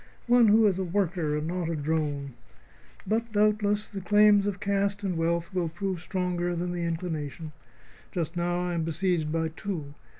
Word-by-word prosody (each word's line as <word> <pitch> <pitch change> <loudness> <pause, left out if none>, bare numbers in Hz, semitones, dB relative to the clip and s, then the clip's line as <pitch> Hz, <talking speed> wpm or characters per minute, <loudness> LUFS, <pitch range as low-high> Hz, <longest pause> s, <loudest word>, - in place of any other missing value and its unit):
One 240 -1 +5
who 220 +1 +6
is 190 -3 +2
a - - 0
worker 175 -4 0
and 150 - -3
not 175 -1 -2
a 165 - -1
drone. 145 -2 -2 0.7
But, 225 +1 -1
doubtless, 210 0 +2
the 200 -2 -6
claims 205 0 +5
of 200 -1 -2
caste 200 0 0
and 185 -3 -1
wealth 170 +2 -1
will 175 -3 0
prove 185 +1 -3
stronger 180 -1 -1
than 175 +1 -2
my 175 - -4
inclination. 160 -3 -3 0.6
Just 170 -1 -3
now 175 0 0
I 180 0 -2
am 170 - 0
besieged 165 -1 0
by 160 0 0
two. 160 -4 -5
175 Hz, 175 wpm, -28 LUFS, 165-200 Hz, 0.7 s, who